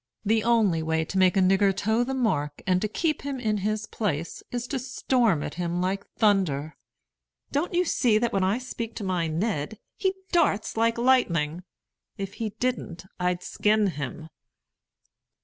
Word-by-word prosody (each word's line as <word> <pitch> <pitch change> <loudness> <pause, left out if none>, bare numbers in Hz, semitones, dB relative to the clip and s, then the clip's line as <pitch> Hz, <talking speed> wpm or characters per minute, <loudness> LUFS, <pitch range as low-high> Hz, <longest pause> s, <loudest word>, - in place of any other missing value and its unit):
The 220 +1 +2
only 220 -8 +3
way 160 0 0
to 190 - -4
make 185 0 +4
a - - +5
nigger 195 +1 +4
toe 220 +4 +2
the 265 +2 -3
mark, 150 - -1
and 185 -1 +2
to 215 - +1
keep 310 +8 -1
him 275 -2 -4
in 215 -3 0
his 215 +2 -1
place, 170 -7 -3
is 245 0 -3
to 275 - -1
storm 245 - +1
at - - -5
him 175 0 -2
like 190 +2 -1
thunder. 175 -9 +1 0.8
Don't 315 +5 -1
you 360 +1 +3
see 235 -9 +3
that 235 +1 0
when 195 - +2
I 195 +4 +2
speak 235 -3 -6
to 215 - -5
my 180 -3 0
Ned, 165 +2 -2 0.2
he 380 -1 0 0.2
darts 310 - +2
like 230 +1 +2
lightning? 180 -11 +2 0.6
If 195 0 -5
he 220 - 0
didn't, 245 -9 -2
I'd 180 0 0
skin 215 0 +2
him." 150 +2 -6
205 Hz, 170 wpm, -26 LUFS, 175-235 Hz, 0.8 s, a